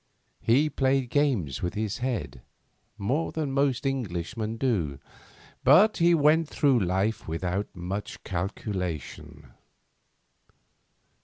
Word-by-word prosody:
He 135 Hz, +7 st, +3 dB
played 135 Hz, -3 st, 0 dB
games 120 Hz, -, +1 dB
with 90 Hz, -, -3 dB
his 105 Hz, -1 st, -2 dB
head, 105 Hz, -, -3 dB, 0.6 s
more 125 Hz, +11 st, -1 dB
than 155 Hz, -4 st, -2 dB
most 140 Hz, -1 st, +1 dB
Englishmen 110 Hz, -3 st, -3 dB
do, 95 Hz, -, 0 dB, 0.7 s
but 185 Hz, -, +6 dB
he 170 Hz, 0 st, +5 dB
went 155 Hz, +1 st, +3 dB
through 140 Hz, -5 st, +3 dB
life 95 Hz, +3 st, -1 dB
without 90 Hz, +5 st, -2 dB
much 95 Hz, +4 st, -5 dB
calculation. 90 Hz, -, -5 dB
115 Hz, 100 wpm, -27 LUFS, 90-140 Hz, 0.7 s, but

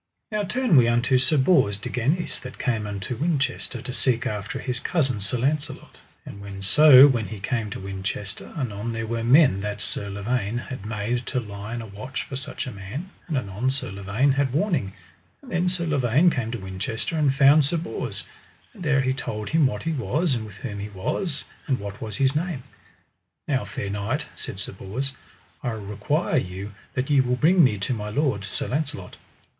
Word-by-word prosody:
Now 215 Hz, -1 st, 0 dB
turn 215 Hz, -, +2 dB
we 120 Hz, -2 st, +7 dB
unto 120 Hz, +2 st, +3 dB
Sir 130 Hz, +4 st, +3 dB
Bors 130 Hz, -, +4 dB
de -, -, -6 dB
Ganis 145 Hz, +9 st, 0 dB
that 125 Hz, 0 st, -9 dB
came 110 Hz, -5 st, -1 dB
unto 100 Hz, +4 st, -4 dB
Winchester 140 Hz, -4 st, -1 dB
to 125 Hz, -, -5 dB
seek 125 Hz, -2 st, +1 dB
after 105 Hz, -1 st, -3 dB
his 125 Hz, -2 st, -1 dB
cousin 135 Hz, -, 0 dB
Sir 100 Hz, +5 st, -1 dB
Launcelot. 140 Hz, +5 st, -2 dB, 0.3 s
And 100 Hz, -1 st, -7 dB
so 140 Hz, +5 st, +9 dB
when 120 Hz, -6 st, 0 dB
he 110 Hz, -, -7 dB
came 110 Hz, +2 st, -1 dB
to -, -, -6 dB
Winchester, 95 Hz, +1 st, -5 dB
anon 115 Hz, -4 st, -3 dB
there 115 Hz, 0 st, -3 dB
were 115 Hz, 0 st, -2 dB
men 125 Hz, -, +5 dB
that 105 Hz, 0 st, -3 dB
Sir 100 Hz, 0 st, -1 dB
Lavaine 105 Hz, +2 st, -1 dB
had 120 Hz, -4 st, -6 dB
made 115 Hz, +3 st, -2 dB
to 130 Hz, -, 0 dB
lie 105 Hz, 0 st, -6 dB
in 120 Hz, -, -4 dB
a -, -, -7 dB
watch 110 Hz, +6 st, -5 dB
for 135 Hz, -, -7 dB
such 140 Hz, +3 st, -4 dB
a 130 Hz, -, -5 dB
man, 115 Hz, -, -7 dB, 0.2 s
and 155 Hz, -5 st, -1 dB
anon 110 Hz, +1 st, -1 dB
Sir 135 Hz, -5 st, -3 dB
Lavaine 100 Hz, +8 st, +1 dB
had 135 Hz, -1 st, +1 dB
warning; 150 Hz, -, 0 dB, 0.5 s
and 255 Hz, -, -12 dB
then 175 Hz, 0 st, +2 dB
Sir 180 Hz, -1 st, -1 dB
Lavaine 145 Hz, +2 st, +3 dB
came 120 Hz, -6 st, -2 dB
to 120 Hz, -, -3 dB
Winchester 95 Hz, -, -3 dB
and 150 Hz, -3 st, +3 dB
found 140 Hz, +3 st, +6 dB
Sir 150 Hz, +5 st, 0 dB
Bors, 165 Hz, -, -4 dB, 0.5 s
and 210 Hz, -, -14 dB
there 150 Hz, -5 st, +3 dB
he 130 Hz, 0 st, +1 dB
told 105 Hz, -5 st, -4 dB
him 155 Hz, -3 st, +5 dB
what 105 Hz, -5 st, -4 dB
he 165 Hz, -, 0 dB
was, 155 Hz, +2 st, 0 dB
and 110 Hz, -3 st, -2 dB
with 100 Hz, -2 st, -12 dB
whom 105 Hz, -6 st, -5 dB
he 105 Hz, +1 st, -5 dB
was, 140 Hz, -, -2 dB, 0.2 s
and 130 Hz, -2 st, +1 dB
what 100 Hz, 0 st, -7 dB
was 110 Hz, -2 st, -4 dB
his 135 Hz, 0 st, +2 dB
name. 160 Hz, -4 st, -2 dB, 0.8 s
Now 130 Hz, -4 st, 0 dB
fair 100 Hz, -, -4 dB
knight, 110 Hz, +9 st, -2 dB
said 95 Hz, -, -6 dB
Sir -, -, -4 dB
Bors, 120 Hz, +8 st, -4 dB, 0.5 s
I 125 Hz, -, -1 dB
require 110 Hz, -, -1 dB
you 95 Hz, +3 st, -3 dB, 0.2 s
that 130 Hz, +3 st, -1 dB
ye 140 Hz, -2 st, +6 dB
will 125 Hz, -1 st, +1 dB
bring 170 Hz, +6 st, +5 dB
me 110 Hz, -6 st, +4 dB
to 100 Hz, +6 st, -1 dB
my 105 Hz, -2 st, -4 dB
lord, 120 Hz, -4 st, 0 dB
Sir 100 Hz, -, -3 dB
Launcelot. 140 Hz, -, -3 dB
125 Hz, 200 wpm, -25 LUFS, 105-145 Hz, 0.8 s, so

